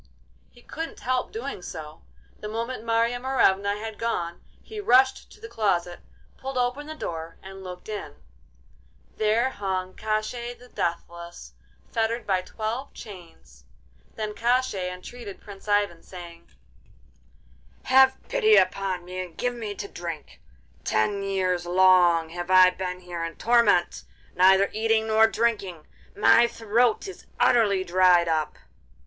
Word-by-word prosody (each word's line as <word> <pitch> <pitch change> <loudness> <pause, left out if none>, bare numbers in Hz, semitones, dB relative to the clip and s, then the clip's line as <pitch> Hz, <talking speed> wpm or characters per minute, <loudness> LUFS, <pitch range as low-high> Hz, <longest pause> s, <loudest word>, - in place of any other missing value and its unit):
He 240 - -20
couldn't 325 +1 -7
help 255 0 -1
doing 235 -2 -5
so. 155 -3 -9 0.4
The 210 - -6
moment 230 +2 -4
Marya 230 +1 +1
Morevna 205 -6 +2
had 220 0 -7
gone 175 -7 -2 0.2
he 435 -1 -8
rushed 265 -8 +3
to - - -16
the 450 - -9
closet, 180 - -1 0.4
pulled 270 0 -5
open 250 +4 -1
the 310 - -6
door, 165 - -6
and 195 0 -10
looked 180 -1 -9
in—there 65 - -5
hung 185 -3 -3
Koshchei 220 +3 -3
the 250 0 -17
Deathless, 170 - -5 0.4
fettered 230 +1 -1
by 190 -3 +1
twelve 225 +8 -5
chains. 165 - -13 0.5
Then 215 -1 -4
Koshchei 235 -6 0
entreated 200 +3 -9
Prince 200 0 -13
Ivan, 205 -5 +1
saying: 170 -2 -11 1.4
'Have 265 0 +5
pity 435 -4 +4
upon 185 -1 +1
me 185 +1 -6
and 175 -3 -13
give 245 0 -1
me 220 -4 -6
to 200 - -6
drink! 170 - -8 0.4
Ten 200 - 0
years 185 -3 -1
long 175 -2 +4
have 175 +2 -6
I 185 0 +7
been 180 0 -5
here 175 -2 -6
in 165 -1 -5
torment, 230 -7 +2 0.3
neither 190 +2 +5
eating 220 0 +1
nor 220 0 +5
drinking; 205 -9 -1 0.3
my 115 - +5
throat 230 - +1
is 385 - -11
utterly 205 -5 +3
dried 180 -1 +4
up. 155 -2 -1
200 Hz, 135 wpm, -25 LUFS, 175-235 Hz, 1.4 s, I